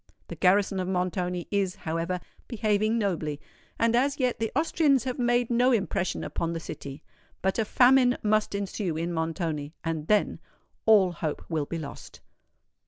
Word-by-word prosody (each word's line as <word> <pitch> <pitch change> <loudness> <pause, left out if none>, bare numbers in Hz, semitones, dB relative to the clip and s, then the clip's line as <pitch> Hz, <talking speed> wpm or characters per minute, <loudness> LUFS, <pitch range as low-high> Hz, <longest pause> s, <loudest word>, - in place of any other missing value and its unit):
The - - -6
garrison 195 +1 +3
of 185 - -2
Montoni 180 -1 -2
is, 195 -3 0
however, 165 +3 -3 0.3
behaving 215 -1 +1
nobly; 165 -9 -1 0.4
and 230 0 +2
as 275 +4 +1
yet 250 -2 0
the 225 -1 -1
Austrians 295 -5 +2
have 255 0 -4
made 240 0 +2
no 245 +2 +4
impression 195 -5 0
upon 170 0 -2
the 165 - -3
city. 140 -2 -8 0.4
But 190 +3 +1
a 220 - +2
famine 250 +2 +5
must 215 -1 +1
ensue 195 -4 -3
in 170 +2 -2
Montoni;—and 160 -1 -3
then, 210 -1 +2 0.5
all 200 -5 +6
hope 160 -3 -4
will 155 -4 -1
be 170 - -4
lost!" 155 -3 -9
195 Hz, 155 wpm, -27 LUFS, 165-230 Hz, 0.5 s, all